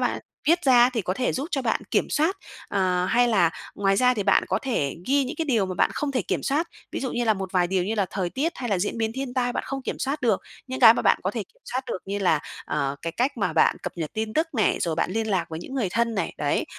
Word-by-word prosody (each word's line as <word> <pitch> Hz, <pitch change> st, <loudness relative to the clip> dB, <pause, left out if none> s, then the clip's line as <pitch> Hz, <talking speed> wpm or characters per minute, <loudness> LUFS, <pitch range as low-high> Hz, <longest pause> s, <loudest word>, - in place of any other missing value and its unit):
bạn -, -, 0 dB, 0.3 s
viết 340 Hz, +2 st, +3 dB
ra 250 Hz, -2 st, +6 dB
thì 235 Hz, -4 st, -2 dB
có 185 Hz, 0 st, -2 dB
thể 255 Hz, +4 st, 0 dB
giúp 270 Hz, +3 st, -2 dB
cho 270 Hz, -5 st, -1 dB
bạn 225 Hz, -, 0 dB
kiểm -, -, +1 dB
soát. 320 Hz, +6 st, +1 dB, 0.3 s
Ờ, 185 Hz, -2 st, +1 dB
hay 245 Hz, +4 st, +3 dB
là 195 Hz, -8 st, +4 dB, 0.2 s
ngoài 195 Hz, -1 st, +2 dB
ra 250 Hz, +3 st, +4 dB
thì 210 Hz, -, -1 dB
bạn 200 Hz, -, +3 dB
có -, -, +1 dB
thể 150 Hz, -, -1 dB
ghi 275 Hz, +1 st, +3 dB
những 285 Hz, +5 st, -5 dB
cái 325 Hz, -, -1 dB
điều 230 Hz, -10 st, +1 dB
mà 185 Hz, -, -4 dB
bạn -, -, +2 dB
không 290 Hz, -2 st, -2 dB
thể 255 Hz, -, 0 dB
kiểm -, -, -2 dB
soát. 305 Hz, +5 st, 0 dB, 0.2 s
Ví -, -, -3 dB
dụ 260 Hz, -, -3 dB
như 240 Hz, 0 st, 0 dB
là 220 Hz, -, +3 dB
một 190 Hz, -2 st, -5 dB
vài 180 Hz, -2 st, +3 dB
điều 185 Hz, 0 st, 0 dB
như 215 Hz, +4 st, -1 dB
là 200 Hz, -3 st, +1 dB
thời 185 Hz, -3 st, -2 dB
tiết 290 Hz, -, -1 dB
hay 245 Hz, -, -4 dB
là 200 Hz, -4 st, +1 dB
diễn 205 Hz, +5 st, -2 dB
biến 225 Hz, 0 st, 0 dB
thiên 265 Hz, -1 st, -4 dB
tai 245 Hz, -1 st, +1 dB
bạn -, -, -3 dB
không 270 Hz, -1 st, -4 dB
kiểm -, -, -4 dB
soát 275 Hz, +3 st, -2 dB
được. 225 Hz, -6 st, +2 dB, 0.3 s
Những 260 Hz, 0 st, -5 dB
cái 230 Hz, -2 st, +9 dB
mà -, -, -1 dB
bạn -, -, +4 dB
có -, -, 0 dB
thể -, -, -3 dB
kiểm -, -, -24 dB
soát 255 Hz, -, 0 dB
được 230 Hz, -, -3 dB
như 200 Hz, +1 st, -3 dB
là, 175 Hz, -6 st, +2 dB, 0.2 s
ờ, 140 Hz, -2 st, -1 dB
cái 165 Hz, 0 st, -3 dB
cách 265 Hz, +4 st, 0 dB
mà -, -, 0 dB
bạn -, -, +4 dB
cập -, -, -4 dB
nhật 160 Hz, -3 st, -4 dB
tin 220 Hz, 0 st, -3 dB
tức 320 Hz, +2 st, +2 dB
này, 215 Hz, -4 st, +2 dB
rồi 165 Hz, -2 st, 0 dB
bạn 165 Hz, +2 st, 0 dB
liên 220 Hz, +3 st, -1 dB
lạc 185 Hz, -4 st, +1 dB
với 160 Hz, -, -5 dB
những 265 Hz, +9 st, -8 dB
người 235 Hz, -8 st, 0 dB
thân 230 Hz, +3 st, 0 dB
này, 195 Hz, -5 st, -2 dB
đấy. 145 Hz, -1 st, 0 dB
225 Hz, 295 wpm, -25 LUFS, 190-260 Hz, 0.3 s, cái